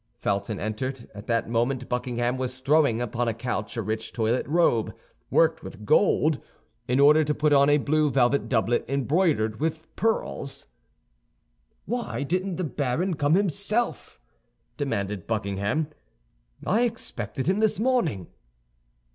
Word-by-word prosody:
Felton 100 -1 -2
entered. 120 +4 -4
At 105 +1 -10
that 115 -1 0
moment 120 +3 -1
Buckingham 125 0 -1
was 130 0 -4
throwing 140 -3 +3
upon 120 +1 -2
a 115 - -1
couch 115 -2 -4
a 115 - -1
rich 110 +2 -3
toilet 115 +1 0
robe, 170 +3 +2 0.3
worked - - +3
with - - -10
gold, 160 - +3 0.5
in 125 +2 +1
order 150 +2 +6
to 150 0 -1
put 150 0 +2
on 140 0 +5
a 145 - +5
blue 150 +1 +2
velvet 135 +1 +2
doublet 120 -1 +1
embroidered 140 - +1
with 160 +1 -3
pearls. 220 -10 -2 1.2
"Why 235 -9 -3
didn't 185 +5 -1
the 185 - -3
baron 150 +5 -1
come 145 0 +2
himself?" 200 +5 0 0.6
demanded 100 - -3
Buckingham. 105 +6 -1 0.8
"I 215 +5 +2
expected 135 - -3
him 190 +4 +1
this 215 -3 +2
morning." 220 - +1
135 Hz, 135 wpm, -26 LUFS, 115-160 Hz, 1.2 s, order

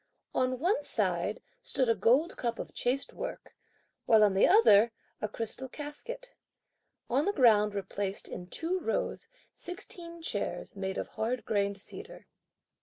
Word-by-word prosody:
On 255 0 +1
one 365 - +1
side - - -1 0.2
stood 275 - 0
a 230 - +5
gold 250 - +3
cup 235 -1 -2
of - - -6
chased 260 +3 -1
work, - - -6 0.5
while 220 -2 +7
on 205 -2 +5
the 190 - +5
other, 235 - +7 0.3
a 215 - 0
crystal 230 +5 -5
casket. 395 - -7 0.7
On 270 +5 +2
the 405 - +3
ground 210 - +5
were 200 - -1
placed, 195 0 -4
in 180 - -7
two 335 - -2
rows, 335 - -2 0.3
sixteen 345 -2 -9
chairs, - - -3
made 190 -1 -3
of - - -3
hard 235 +2 -2
grained 200 -1 +1
cedar. 430 - -10
255 Hz, 150 wpm, -31 LUFS, 210-340 Hz, 0.7 s, while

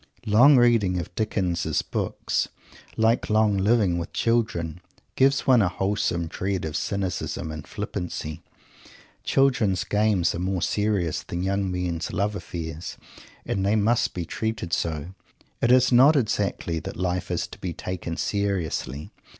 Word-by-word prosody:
Long 125 +7 +6
reading 115 -7 +3
of 85 +1 -6
Dickens' 95 -6 -1
books, - - -2 0.5
like 115 +2 +2
long 110 -1 +3
living 100 -3 +2
with 85 - -6
children, 90 -8 0 0.3
gives 135 +1 +3
one 125 -3 +5
a 95 - +2
wholesome 95 -3 -1
dread 95 +2 -3
of 75 -1 -4
cynicism 95 -2 -2
and 75 -1 -8
flippancy. 80 -3 -5 0.8
Children's 120 -9 +2
games 105 -4 +2
are - - -4
more 90 -1 -1
serious 100 -7 0
than 85 +1 -4
young 100 0 0
men's 90 -2 -2
love 100 +1 -1
affairs, 85 -2 -6 0.5
and 95 - -1
they 100 +2 +2
must 110 +2 +2
be 85 -2 -3
treated 110 -2 -3
so. 80 +1 -2 0.5
It 120 - +3
is 130 0 +5
not 135 +6 +7
exactly 100 - 0
that - - -7
life 90 0 -2
is 90 -2 -1
to - - -12
be 90 - -3
"taken 85 0 -5
seriously." 85 -8 -2
95 Hz, 140 wpm, -25 LUFS, 85-110 Hz, 0.8 s, not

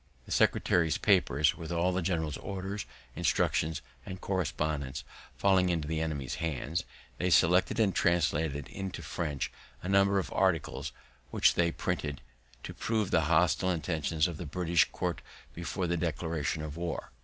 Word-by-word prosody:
The - - -12
secretary's 80 -3 +3
papers, 75 +1 +3
with 85 0 -7
all 85 +2 +2
the 95 - 0
general's 80 -4 -1
orders, 100 +1 -5 0.3
instructions, 80 -1 +1 0.2
and 95 -1 -7
correspondence, 75 -6 -2 0.3
falling 95 -2 +4
into 80 -4 0
the 80 0 -1
enemy's 70 -4 -2
hands, 80 +1 -2 0.3
they 90 - +1
selected 90 +5 +4
and 105 -4 +3
translated 80 -4 +1
into 95 -3 -5
French 75 -3 -3 0.3
a - - -4
number 100 0 +4
of 95 - -1
the - - -8
articles, 80 -6 0 0.4
which - - +4
they 85 -1 +2
printed, 75 -3 -2 0.4
to - - -6
prove 110 -4 -1
the 80 - +3
hostile 90 +3 +3
intentions 80 -1 0
of 85 -3 -5
the 85 - -6
British 85 +1 +2
court - - -2 0.3
before 90 +2 -3
the 85 0 0
declaration 80 -1 -2
of 75 0 -6
war. 85 -1 -4
85 Hz, 155 wpm, -30 LUFS, 75-90 Hz, 0.4 s, falling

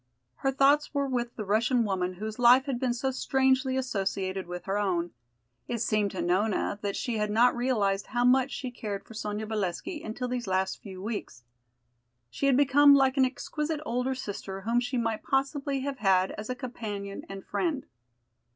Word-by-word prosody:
Her 270 - 0
thoughts 285 +2 +3
were 280 0 +2
with 240 -3 -2
the 215 - -5
Russian 230 +4 +2
woman 185 -3 -1
whose 215 +4 -6
life 245 +2 +7
had 265 -4 -2
been 250 -2 0
so 265 +2 -1
strangely 265 0 +2
associated 195 -6 -2
with 180 0 -6
her 195 +1 0
own. 175 -4 0 0.6
It 240 - -2
seemed 215 -2 +1
to 185 -3 -4
Nona 200 +3 0
that 200 -1 -2
she 240 -3 -2
had 210 0 0
not 235 +4 +4
realized 210 -6 0
how 245 0 0
much 260 +1 +4
she 260 -2 -5
cared 205 -4 -5
for - - -12
Sonya 210 0 -4
Valesky 215 - -3
until 240 +3 -4
these 245 -3 -3
last 190 0 0
few 190 -2 -9
weeks. 205 - -5 0.9
She 275 - -1
had 265 -2 +4
become 285 +1 +7
like 265 -1 +3
an 265 -2 +5
exquisite 300 +4 -3
older 250 +1 -1
sister 195 -5 -6
whom 230 +4 +1
she 245 +1 -2
might 230 -2 -1
possibly 275 0 -1
have 275 -1 -4
had 190 -2 +3
as 215 +2 -7
a 255 - -1
companion 210 -5 -6
and 195 -1 -8
friend. 310 -7 -1
235 Hz, 185 wpm, -28 LUFS, 200-265 Hz, 0.9 s, life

